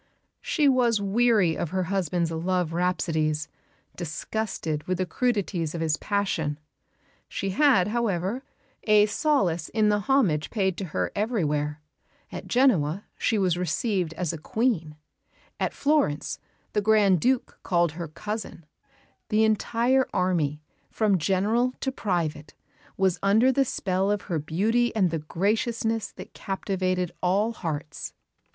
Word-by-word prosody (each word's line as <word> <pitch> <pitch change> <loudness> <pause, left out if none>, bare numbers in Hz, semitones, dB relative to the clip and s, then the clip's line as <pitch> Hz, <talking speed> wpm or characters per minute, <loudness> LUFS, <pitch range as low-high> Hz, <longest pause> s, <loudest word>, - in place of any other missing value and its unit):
She 300 -3 +1
was 245 -5 +3
weary 200 -4 +3
of 170 - -3
her 185 +2 -1
husband's 175 -2 -1
love 175 0 -1
rhapsodies, 160 -3 0 0.5
disgusted 165 -1 -3
with 185 0 0
the 185 - 0
crudities 190 -7 -1
of 165 - -3
his 160 -2 +1
passion. 190 -8 -1 0.7
She 195 - -3
had, 230 -4 +4
however, 215 0 -1 0.4
a 210 -1 +6
solace 210 - +1
in 215 -1 +2
the 205 0 +2
homage 205 - +2
paid 190 -5 0
to 195 - -3
her 155 - -2
everywhere. 150 -9 -1 0.5
At - - -7
Genoa 200 - +2
she 225 - 0
was 180 -3 +1
received 180 -2 -1
as 175 -3 -2
a 165 - -6
Queen; 175 -5 -1 0.6
at - - 0
Florence 285 - 0 0.3
the 210 - +2
Grand 205 -3 +4
Duke 255 -1 0
called 175 -2 +1
her 170 +1 -6
"cousin"; 205 +1 -6 0.6
the 215 +1 +3
entire 235 +4 +2
army, 155 -5 0 0.3
from 205 -4 +1
General 210 +9 +1
to 265 - -1
private, 170 - -2 0.4
was 190 -2 +2
under 220 +6 +4
the 270 +1 +2
spell 190 -4 -1
of 205 0 0
her 170 -5 -2
beauty 215 +11 +1
and 190 -6 +2
the 165 - -1
graciousness 220 +7 -1
that - - -11
captivated 185 -2 -2
all 195 +5 +2
hearts. 150 -6 -5
190 Hz, 135 wpm, -26 LUFS, 165-220 Hz, 0.7 s, a